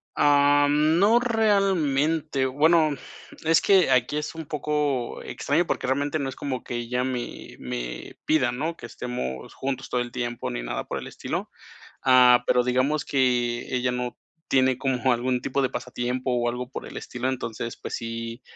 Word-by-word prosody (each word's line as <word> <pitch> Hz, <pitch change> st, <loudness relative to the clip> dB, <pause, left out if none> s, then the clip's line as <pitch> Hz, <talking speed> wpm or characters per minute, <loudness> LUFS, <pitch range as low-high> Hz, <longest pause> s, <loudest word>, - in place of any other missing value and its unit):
Ah, 145 Hz, 0 st, +5 dB
no 165 Hz, +11 st, +4 dB
realmente, 165 Hz, -, +1 dB
bueno, 155 Hz, +4 st, +4 dB, 0.6 s
es 160 Hz, 0 st, +4 dB
que 190 Hz, -7 st, +4 dB
aquí 130 Hz, +4 st, +2 dB
es 150 Hz, +2 st, -4 dB
un 160 Hz, -2 st, -6 dB
poco 145 Hz, -4 st, -2 dB
extraño, 165 Hz, +5 st, 0 dB
porque 125 Hz, -, -2 dB
realmente 145 Hz, +3 st, 0 dB
no 135 Hz, -, -2 dB
es 130 Hz, -, -5 dB
como 130 Hz, -3 st, -4 dB
que 120 Hz, -, -4 dB
ella 125 Hz, +2 st, -1 dB
me 125 Hz, -2 st, -5 dB
me 60 Hz, -1 st, -6 dB
pida, 135 Hz, -6 st, +2 dB
¿no?, 155 Hz, +7 st, -3 dB
que -, -, -10 dB
estemos 65 Hz, -, -5 dB
juntos 135 Hz, -1 st, -4 dB
todo 125 Hz, -, 0 dB
el 120 Hz, 0 st, -5 dB
tiempo 120 Hz, -, -3 dB
ni -, -, -4 dB
nada -, -, -3 dB
por -, -, -4 dB
el -, -, -8 dB
estilo, -, -, -4 dB, 0.6 s
ah, 125 Hz, -1 st, +6 dB
pero 125 Hz, -, +4 dB
digamos 130 Hz, +4 st, +1 dB
que 125 Hz, -3 st, +1 dB
ella 125 Hz, 0 st, +1 dB
no 125 Hz, 0 st, -3 dB, 0.3 s
tiene 130 Hz, -1 st, +3 dB
como 130 Hz, -1 st, +1 dB
algún 125 Hz, +1 st, 0 dB
tipo 140 Hz, +1 st, -1 dB
de 130 Hz, -, +1 dB
pasatiempo 125 Hz, +1 st, -3 dB
o 120 Hz, -1 st, +1 dB
algo 125 Hz, +1 st, -4 dB
por -, -, -6 dB
el -, -, -9 dB
estilo, 125 Hz, +1 st, -4 dB
entonces, 115 Hz, -2 st, -4 dB
pues -, -, -7 dB
sí, 115 Hz, +1 st, -5 dB
130 Hz, 170 wpm, -25 LUFS, 120-150 Hz, 0.6 s, ah